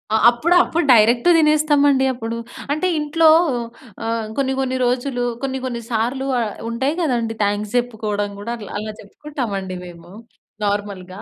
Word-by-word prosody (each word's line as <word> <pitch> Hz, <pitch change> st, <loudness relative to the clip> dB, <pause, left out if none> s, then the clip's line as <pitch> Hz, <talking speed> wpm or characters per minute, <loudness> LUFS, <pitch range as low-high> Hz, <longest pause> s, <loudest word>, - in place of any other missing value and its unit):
ఆహ్, 220 Hz, -, +2 dB
అప్పుడు 315 Hz, +9 st, +1 dB
అప్పుడు 335 Hz, -3 st, -1 dB
డైరెక్ట్ 235 Hz, +4 st, +5 dB
తినేస్తామండి 295 Hz, -3 st, +3 dB
అప్పుడు. 230 Hz, -2 st, -5 dB, 0.4 s
అంటే 365 Hz, +5 st, 0 dB
ఇంట్లో 315 Hz, +2 st, +3 dB, 0.8 s
ఆహ్, 225 Hz, -1 st, -2 dB
కొన్ని 265 Hz, -1 st, +1 dB
కొన్ని 260 Hz, -1 st, -1 dB
రోజులు 245 Hz, 0 st, -1 dB, 0.2 s
కొన్ని 265 Hz, -1 st, -2 dB
కొన్ని 240 Hz, -2 st, -4 dB
సార్లు 245 Hz, +4 st, -1 dB
ఆహ్, 220 Hz, -3 st, -2 dB, 0.2 s
ఉంటాయి 265 Hz, +6 st, -1 dB
గదండీ! 235 Hz, -7 st, -1 dB
థాంక్స్ 205 Hz, +2 st, -1 dB
చెప్పుకోవడం 215 Hz, -4 st, -2 dB
గూడా 230 Hz, +4 st, -4 dB, 0.2 s
అలా 215 Hz, 0 st, -5 dB
చెప్పుకుంటామండి 205 Hz, -7 st, -5 dB
మేము 170 Hz, 0 st, -13 dB, 0.5 s
నార్మల్‌గా. 200 Hz, -2 st, -3 dB
240 Hz, 135 wpm, -20 LUFS, 210-275 Hz, 0.8 s, డైరెక్ట్